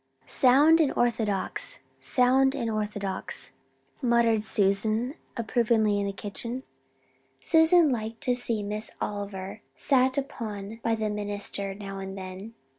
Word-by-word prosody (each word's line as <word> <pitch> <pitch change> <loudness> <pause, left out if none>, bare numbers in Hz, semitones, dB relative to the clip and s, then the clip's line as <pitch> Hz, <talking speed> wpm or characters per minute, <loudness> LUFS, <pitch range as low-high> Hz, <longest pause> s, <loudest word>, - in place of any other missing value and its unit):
"Sound 290 +6 +5
and 295 - +2
orthodox 230 - 0 0.2
sound 265 +2 +3
and 235 -5 -2
orthodox," 205 -3 -3 0.5
muttered 235 -3 +3
Susan 215 +4 +1 0.2
approvingly 225 -2 +2
in 200 - -1
the - - -1
kitchen. 230 +6 -6 0.8
Susan 320 -1 +5
liked 225 -1 -3
to 250 - +1
see 235 -3 -2
Miss 210 +2 -4
Oliver 200 0 -5
sat 260 -1 +2
upon 220 -6 -5
by 230 0 +1
the 215 -1 -2
minister 205 -1 -4
now 195 -1 -7
and 195 0 -6
then. 190 +4 -8
220 Hz, 120 wpm, -27 LUFS, 205-250 Hz, 0.8 s, Sound